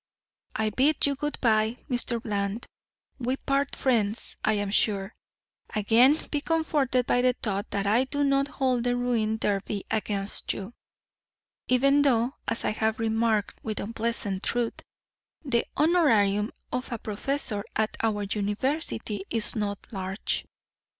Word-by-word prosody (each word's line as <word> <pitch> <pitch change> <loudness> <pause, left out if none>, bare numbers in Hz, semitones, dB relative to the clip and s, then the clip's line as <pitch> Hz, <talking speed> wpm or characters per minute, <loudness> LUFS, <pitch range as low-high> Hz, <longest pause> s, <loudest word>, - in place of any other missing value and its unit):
I 215 0 0
bid 280 +7 +3
you 285 - +2
good 295 +2 -3
by, 220 0 +2
Mr. 245 -3 -1
Bland. 205 0 -2 0.5
We 255 +2 -1
part 275 +1 -1
friends, 225 -4 +1
I 215 - +3
am 205 -1 -1
sure. 200 -1 +1 0.6
Again 235 +7 +5
be 295 - 0
comforted 295 -6 +1
by 245 - +2
the 250 0 +3
thought 205 -3 -3
that 200 0 -2
I 225 +6 +3
do 285 +2 0
not 275 0 +2
hold 255 -4 0
the 245 0 +1
ruined 225 -3 0
derby 200 0 -1
against 205 -2 -1
you. 200 +4 -7 0.9
Even 275 +3 +4
though, 250 -2 +2
as 230 - +1
I - - +2
have 220 +1 0
remarked 225 -1 0
with 215 -2 -3
unpleasant 225 -3 -2
truth, 240 -1 -2 0.6
the 235 -4 +1
honorarium 225 - +3 0.2
of 250 +1 -3
a 235 - -2
professor 215 0 -1
at 220 0 0
our 215 -2 0
university 210 +1 -2
is 225 -2 +3
not 205 +1 -4
large." 190 0 -2
225 Hz, 140 wpm, -27 LUFS, 210-260 Hz, 0.9 s, Again